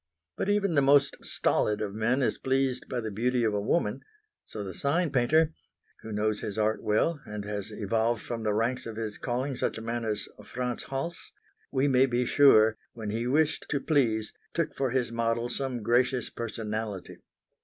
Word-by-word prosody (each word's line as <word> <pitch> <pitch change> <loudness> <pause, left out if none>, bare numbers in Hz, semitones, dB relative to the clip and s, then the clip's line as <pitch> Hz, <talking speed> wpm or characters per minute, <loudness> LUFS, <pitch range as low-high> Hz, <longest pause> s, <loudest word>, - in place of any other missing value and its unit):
But - - -2
even 200 -3 +2
the 140 - +4
most 140 0 +4
stolid 105 0 +1
of 100 -2 -3
men 120 +5 +1
is - - 0
pleased 130 -1 0
by 125 - -2
the 110 -1 -4
beauty 120 +4 +1
of 110 -2 +2
a 100 - 0
woman; 140 +11 0 0.4
so 105 - -6
the 95 -2 -6
sign 155 - 0
painter 150 +5 +3 0.5
who 110 - -8
knows 105 0 0
his 105 0 -5
art 110 0 +1
well, 140 +9 +1
and 105 -1 -5
has 105 0 -4
evolved 110 +2 0
from 115 +1 -5
the 110 -1 0
ranks 115 +3 0
of 115 - -6
his 110 -2 -4
calling 130 +3 -2
such - - -1
a - - -6
man 115 +1 -2
as 110 -2 -2 0.2
Franz 125 +3 -3
Hals 135 +6 -4 0.4
we 135 +2 +2
may 130 -1 +4
be 125 0 +1
sure, 110 -6 +6 0.2
when 110 -3 -5
he 115 +3 -2
wished 150 +4 +1
to 145 - 0
please, 115 -8 +1 0.2
took - - 0
for 135 -1 0
his 120 -2 0
model 115 +1 0
some 125 -2 -3
gracious 125 +2 +2
personality. 110 -3 -4
120 Hz, 185 wpm, -28 LUFS, 110-135 Hz, 0.5 s, sure